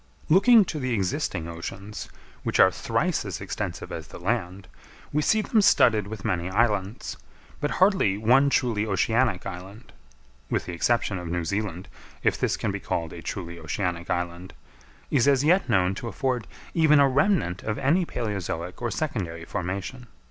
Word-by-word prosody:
Looking 210 +6 +7
to 155 - -4
the 130 -3 -1
existing 95 - -1
oceans, 95 +5 -7 0.3
which - - -1
are - - +7
thrice - - -1
as - - -5
extensive - - -5
as - - -6
the - - -10
land, 95 -1 -2 0.5
we 150 - +2
see 215 +7 +2
them 220 0 +3
studded 110 - +4
with 105 -1 -7
many 90 -4 -1
islands; 105 0 0 0.4
but 145 - -1
hardly 185 - +3
one 130 +6 +4
truly 115 -6 +1
oceanic 110 +1 +1
island 95 +4 -9 0.6
(with - - -1
the 90 - -5
exception 100 +1 +1
of 90 - -6
New 85 0 -2
Zealand, 100 0 -3 0.4
if - - +3
this - - 0
can - - -1
be - - -4
called 85 -1 -3
a 85 - -8
truly 85 -2 -6
oceanic 85 +1 -3
island) 90 +1 -3 0.6
is 140 -1 +3
as 140 -1 +4
yet 175 +6 +3
known 95 0 +3
to 115 - -6
afford 125 -1 -2 0.3
even 155 -3 +5
a 140 - +6
remnant 140 - +1
of 110 - -3
any 145 +7 +2
palæozoic 95 - -4
or 120 - -1
secondary 90 - -3
formation. 100 +8 -4
105 Hz, 165 wpm, -26 LUFS, 90-135 Hz, 0.6 s, Looking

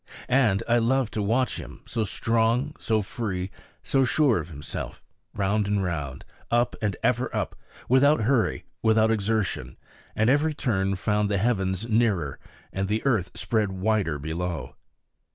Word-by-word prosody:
And 115 -6 +3
I 120 0 +4
loved 125 0 +1
to 110 - -1
watch 115 +6 +1
him, - - -9
so 115 - -1
strong, 115 +6 +1
so 110 -2 +1
free, 95 -3 -3 0.3
so 135 -1 +2
sure 130 -3 +3
of 80 +1 -6
himself 75 -2 -7 0.3
round 100 +1 +1
and 100 -1 +1
round, 75 -7 -4 0.2
up 120 +1 +2
and 105 -4 0
ever - - +2
up, - - -2 0.3
without 140 +2 +5
hurry, 120 +1 +1 0.2
without 110 0 +4
exertion; 110 -2 -1 0.4
and 110 - +2
every 145 +4 +3
turn 95 -8 0
found 105 +2 0
the 100 - +1
heavens 95 -1 0
nearer 105 -10 +1 0.3
and 95 0 -1
the 110 +5 -1
earth 110 -10 +2
spread 105 -4 0
wider 95 -5 0
below. 80 -1 -4
110 Hz, 150 wpm, -26 LUFS, 95-120 Hz, 0.4 s, without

